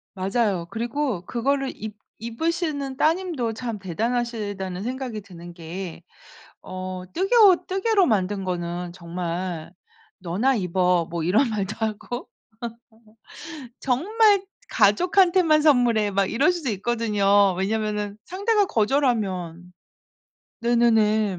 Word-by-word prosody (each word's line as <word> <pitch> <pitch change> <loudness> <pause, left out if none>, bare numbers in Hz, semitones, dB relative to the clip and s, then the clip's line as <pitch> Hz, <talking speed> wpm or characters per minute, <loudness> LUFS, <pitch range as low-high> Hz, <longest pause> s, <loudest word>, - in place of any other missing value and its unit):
맞아요. 195 -2 0
그리고 235 -2 -2
그거를 270 +3 -1
입 215 -1 -7 0.3
입으시는 285 +1 -2
따님도 315 -8 0
참 225 -2 -5
대단하시다는 205 -1 -3
생각이 250 -3 -4
드는 175 -3 -11
게 170 0 -7 0.6
어 185 0 -6
뜨개옷 385 -1 +5
뜨개로 390 0 +2
만든 200 -3 0
거는 175 -1 -3
정말 175 -1 -5 0.5
"너나 200 +10 +1
입어." 180 -3 +1
뭐 170 -1 -3
이런 220 - +3
말도 205 -1 -3
하고 220 +3 -4 1.5
정말 400 - +3 0.3
"가족한테만 345 - +4
선물해." 240 -8 +3
막 195 0 +1
이럴 280 +10 +3
수도 330 -8 -3
있거든요. 205 -2 +2
왜냐면은 210 +1 -2
상대가 405 +3 +1
거절하면 205 - 0 0.9
네네네. 220 -4 +2
220 Hz, 245 characters per minute, -24 LUFS, 185-275 Hz, 1.5 s, 뜨개옷